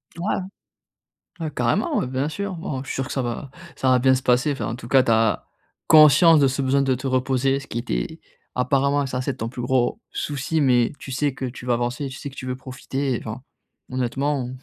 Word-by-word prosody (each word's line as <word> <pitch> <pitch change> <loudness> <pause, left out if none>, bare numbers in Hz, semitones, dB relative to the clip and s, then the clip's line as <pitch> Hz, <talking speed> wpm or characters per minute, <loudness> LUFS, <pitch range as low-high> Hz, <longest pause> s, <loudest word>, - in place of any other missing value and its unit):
Ouais. 175 +5 -1 1.0
Ouais, 160 -2 -3
carrément, 120 -3 0
ouais, - - -2
bien 130 +3 -1
sûr. 200 +3 -4
Bon, 145 -5 -4
je - - -15
suis - - -4
sûr 135 - -1
que - - -5
ça 135 - 0
va 125 +3 -4 0.2
ça 130 - +1
va 130 -1 +5
bien 130 +1 +4
se 130 - -3
passer. 125 +3 +3
Enfin, 135 - -4
en - - -3
tout 120 -1 -10
cas, 130 +1 +5
tu 115 - +1
as 110 -4 +2 0.4
conscience 155 +1 +7
de 140 - +5
ce 135 +1 -1
besoin 135 +1 +2
de 135 -1 +2
te 130 +3 -8
reposer. 130 +1 +1
Ce 135 - -12
qui 115 - -5
était - - -3 0.4
apparemment 140 +3 +2
ça 125 -1 -3
c'est 130 +1 -2
ton 115 - -3
plus 125 0 -6
gros 125 - +1
souci. 145 +2 -2
Mais 125 -4 +3
tu 135 - -8
sais 140 +2 0
que 135 - -4
tu 125 0 -7
vas 125 - +2
avancer, 120 +4 -2
tu 130 - -8
sais 140 - -6
que 135 - -15
tu 130 -2 -7
veux 125 - -2
profiter. 130 0 -3
Enfin 110 +3 -7 0.5
honnêtement, 130 +1 -1
130 Hz, 230 wpm, -23 LUFS, 125-140 Hz, 1.0 s, conscience